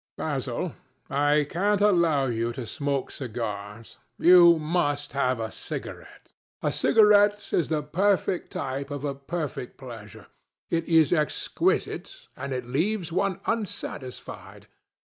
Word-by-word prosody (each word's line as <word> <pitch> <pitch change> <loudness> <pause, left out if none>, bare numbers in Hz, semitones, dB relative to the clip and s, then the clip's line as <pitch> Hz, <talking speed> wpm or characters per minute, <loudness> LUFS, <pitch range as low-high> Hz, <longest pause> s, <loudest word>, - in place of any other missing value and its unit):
Basil, 140 +2 -3 0.4
I 145 +1 +3
can't 200 +5 +1
allow 170 -9 +3
you 115 -1 -1
to 125 0 -6
smoke 140 +3 -2
cigars. 110 -3 -6 0.2
You 175 -1 +7
must 150 -2 -1
have 130 -3 +1
a 110 -1 -3
cigarette. - - -8 0.3
A - - +1
cigarette 205 -1 +4
is 165 - +1
the 155 -2 0
perfect 185 +3 0
type 135 +1 -4
of 145 -1 -5
a 140 - -1
perfect 140 -2 -5
pleasure. 115 -6 -10 0.5
It 165 0 0
is 160 -1 +4
exquisite, 155 -3 -1 0.2
and 140 - -6
it 125 -2 -3
leaves 170 - -1
one 190 +1 0
unsatisfied. 195 - -5
145 Hz, 125 wpm, -26 LUFS, 130-175 Hz, 0.5 s, You